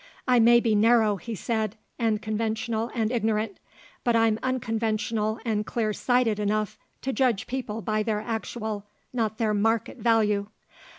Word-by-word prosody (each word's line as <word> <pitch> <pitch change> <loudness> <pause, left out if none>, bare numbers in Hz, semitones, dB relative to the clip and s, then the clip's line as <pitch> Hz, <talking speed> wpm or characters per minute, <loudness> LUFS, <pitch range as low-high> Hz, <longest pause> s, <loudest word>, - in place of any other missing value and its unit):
"I 250 -1 +5
may 235 +1 +7
be 230 -2 +1
narrow," 220 -1 +4
he 230 +4 -6
said, 220 0 -2 0.2
"and 220 -3 +1
conventional 220 +1 -1
and 225 -1 0
ignorant; 220 -3 0 0.4
but 240 -1 +2
I'm 225 -1 +3
unconventional 225 -3 -1
and 215 -2 0
clear 215 -1 -1
sighted 245 -2 +1
enough 210 0 -1 0.2
to 265 - -1
judge 250 -7 +1
people 230 -4 -4
by 215 -1 0
their 215 -1 0
actual, 220 -2 -4 0.3
not 220 -3 -1
their 220 -2 +1
market, 225 +2 +1
value. 210 -3 +2
220 Hz, 145 wpm, -26 LUFS, 215-235 Hz, 0.4 s, may